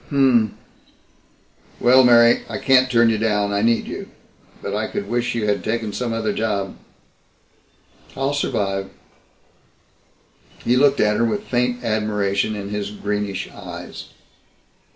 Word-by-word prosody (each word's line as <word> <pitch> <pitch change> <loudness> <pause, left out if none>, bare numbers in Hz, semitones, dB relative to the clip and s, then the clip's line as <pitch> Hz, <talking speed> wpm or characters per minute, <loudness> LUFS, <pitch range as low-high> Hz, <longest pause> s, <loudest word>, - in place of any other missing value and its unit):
"Hm - - -9
m 135 - +5
m. 110 -3 +1 1.2
Well, 130 +2 +6
Mary 120 -1 +6
I - - -4
can't 130 -1 +4
turn 120 -2 +4
you 110 - -1
down. 105 -2 0
I 100 - +1
need 115 +1 +2
you. - - -7 0.5
But 100 - -4
I 110 +1 -1
could 100 - -5
wish 120 +2 -1
you 115 -2 -1
had 100 -3 0
taken 110 -1 -2
some 125 +1 -3
other 110 -2 -1
job." 100 -3 -2 1.4
"I'll 135 +1 0
survive." 100 -8 -2 1.8
He 120 - +3
looked 140 +2 +4
at 105 0 +2
her - - +2
with 110 -3 -1
faint 125 0 -1
admiration 105 -1 0
in 100 -1 -6
his 105 -1 -3
greenish 105 -1 -3
eyes. - - -9
110 Hz, 145 wpm, -21 LUFS, 105-120 Hz, 1.8 s, Well